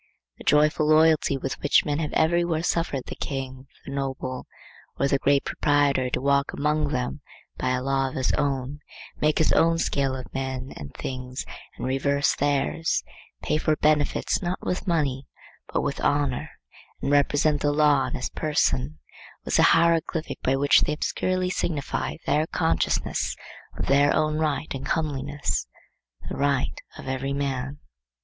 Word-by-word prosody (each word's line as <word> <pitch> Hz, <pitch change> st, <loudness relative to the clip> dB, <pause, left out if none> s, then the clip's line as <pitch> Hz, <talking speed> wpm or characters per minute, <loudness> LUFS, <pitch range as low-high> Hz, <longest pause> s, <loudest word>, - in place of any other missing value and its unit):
The -, -, -10 dB
joyful 150 Hz, +1 st, +3 dB
loyalty 155 Hz, -2 st, +4 dB
with 135 Hz, 0 st, -4 dB
which 145 Hz, -, +4 dB
men 145 Hz, 0 st, -1 dB
have 155 Hz, -2 st, -2 dB
everywhere 170 Hz, 0 st, +2 dB
suffered 165 Hz, -7 st, 0 dB
the -, -, -6 dB
king, 135 Hz, -1 st, -5 dB, 0.2 s
the -, -, -7 dB
noble, 135 Hz, -2 st, -4 dB, 0.5 s
or 140 Hz, -, +2 dB
the 140 Hz, 0 st, +1 dB
great 140 Hz, 0 st, +2 dB
proprietor 145 Hz, -3 st, +2 dB
to 125 Hz, -, -1 dB
walk 140 Hz, +1 st, +1 dB
among 150 Hz, +1 st, +1 dB
them 140 Hz, 0 st, -3 dB, 0.4 s
by 130 Hz, -, 0 dB
a 125 Hz, -, -3 dB
law 135 Hz, 0 st, +1 dB
of -, -, -10 dB
his 130 Hz, -, +1 dB
own, 140 Hz, 0 st, -1 dB, 0.4 s
make 155 Hz, 0 st, +1 dB
his 160 Hz, -, +3 dB
own 165 Hz, 0 st, +4 dB
scale 140 Hz, -5 st, 0 dB
of 130 Hz, -1 st, -8 dB
men 130 Hz, -1 st, -4 dB
and 70 Hz, -1 st, -8 dB
things 130 Hz, 0 st, -5 dB, 0.3 s
and -, -, -4 dB
reverse 140 Hz, +2 st, +1 dB
theirs, 145 Hz, +3 st, 0 dB, 0.4 s
pay 155 Hz, -, +1 dB
for 155 Hz, -, +2 dB
benefits 150 Hz, -1 st, +1 dB
not 180 Hz, 0 st, -2 dB
with 180 Hz, +2 st, -2 dB
money 140 Hz, -6 st, 0 dB, 0.4 s
but -, -, +1 dB
with -, -, -3 dB
honor, 145 Hz, 0 st, 0 dB, 0.5 s
and 140 Hz, -, -2 dB
represent 145 Hz, +1 st, +3 dB
the 145 Hz, -, +2 dB
law 145 Hz, -3 st, +3 dB
in 125 Hz, -, -5 dB
his -, -, -3 dB
person, 150 Hz, -1 st, 0 dB, 0.5 s
was -, -, +1 dB
the -, -, +5 dB, 0.2 s
hieroglyphic 165 Hz, -1 st, +1 dB
by 130 Hz, -, +2 dB
which 140 Hz, +1 st, +5 dB
they 150 Hz, -, +1 dB
obscurely 185 Hz, +4 st, -1 dB
signified 150 Hz, -6 st, -2 dB
their 155 Hz, +2 st, +2 dB
consciousness 80 Hz, -, 0 dB, 0.4 s
of -, -, -2 dB
their 140 Hz, +1 st, +4 dB
own 155 Hz, 0 st, +1 dB
right 155 Hz, 0 st, -1 dB
and 135 Hz, -1 st, -5 dB
comeliness, 145 Hz, -2 st, -1 dB, 0.6 s
the -, -, -4 dB
right 140 Hz, -2 st, 0 dB, 0.2 s
of -, -, -9 dB
every 135 Hz, +1 st, -2 dB
man. 135 Hz, -1 st, -2 dB
145 Hz, 160 wpm, -25 LUFS, 135-155 Hz, 0.6 s, the